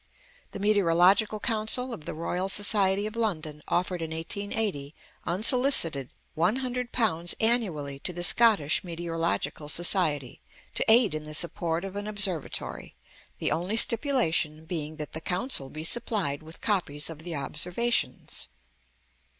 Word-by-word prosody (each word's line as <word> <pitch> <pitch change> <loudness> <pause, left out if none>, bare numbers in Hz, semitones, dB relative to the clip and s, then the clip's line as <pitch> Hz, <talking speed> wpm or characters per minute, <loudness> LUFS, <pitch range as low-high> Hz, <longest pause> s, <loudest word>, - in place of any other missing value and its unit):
The - - -8
Meteorological 200 +1 +3
Council 230 +3 +1
of 155 - -10
the - - -6
Royal 180 +4 -3
Society 200 -1 +1
of 215 +1 -6
London 160 -10 -3
offered 180 0 -1
in 165 - -4
1880, 165 -2 -3 0.3
unsolicited, 190 - +4 0.3
£100 230 -2 0
annually 180 - 0
to 180 - -2
the 175 0 -5
Scottish 200 -7 +4
Meteorological 165 -3 -3
Society, 155 - +1 0.3
to - - +2
aid 220 -5 +6
in 155 0 -5
the 155 0 -2
support 170 +1 0
of 195 0 -8
an 205 +1 -5
Observatory, 200 -7 -2 0.4
the - - -2
only 185 +7 -1
stipulation 210 - +2
being 155 -2 -5
that 150 -1 -8
the 160 - -6
Council 180 - 0
be 155 +2 -7
supplied 195 -7 0
with 160 +1 -11
copies 170 -9 -1
of 155 - -10
the 165 0 -6
observations. 180 - -1
180 Hz, 130 wpm, -26 LUFS, 160-215 Hz, 0.4 s, aid